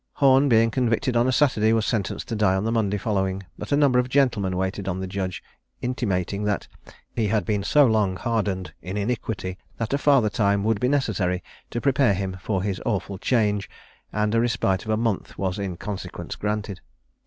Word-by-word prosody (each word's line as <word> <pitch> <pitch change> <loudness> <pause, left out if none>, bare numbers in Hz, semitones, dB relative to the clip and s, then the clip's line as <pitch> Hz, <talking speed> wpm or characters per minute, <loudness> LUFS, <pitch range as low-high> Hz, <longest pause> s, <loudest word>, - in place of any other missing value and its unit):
Horne 135 0 +4
being 115 -1 +4
convicted 125 +1 0
on 120 +1 +3
a - - +3
Saturday, 115 -4 +3
was 110 -2 +1
sentenced 105 -6 -2
to 115 - -2
die 105 -3 +3
on 95 - 0
the 115 - 0
Monday 105 -3 +1
following; 95 -2 -1
but - - -8
a 145 - +4
number 140 -4 +4
of 125 0 0
gentlemen 120 -9 +2
waited 95 +1 -2
on 95 -1 -2
the 95 - -3
judge, 95 -1 -4 0.4
intimating 100 -6 -1
that 105 -2 -1 0.5
he 115 -3 +1
had 105 -3 +1
been 105 -2 0
so 145 +7 +5
long 105 -5 +2
hardened 100 -4 -2
in 95 +3 -5
iniquity, 100 -4 -3 0.2
that 115 +3 -2
a 140 - +1
farther 135 -8 +4
time 100 -2 +2
would 110 -1 +1
be 125 - +1
necessary 95 -10 0 0.3
to 120 - -3
prepare 130 -5 +3
him 95 0 -3
for 95 -1 -1
his 100 -2 -2
awful 100 -3 -2
change, 105 -4 +1 0.4
and 105 0 0
a 115 - +3
respite 110 -5 0
of - - -7
a 110 - +2
month 115 -3 -2
was 95 +1 -2
in 95 -3 -3
consequence 100 +1 -6
granted. 105 -2 -3
105 Hz, 200 wpm, -24 LUFS, 95-120 Hz, 0.5 s, so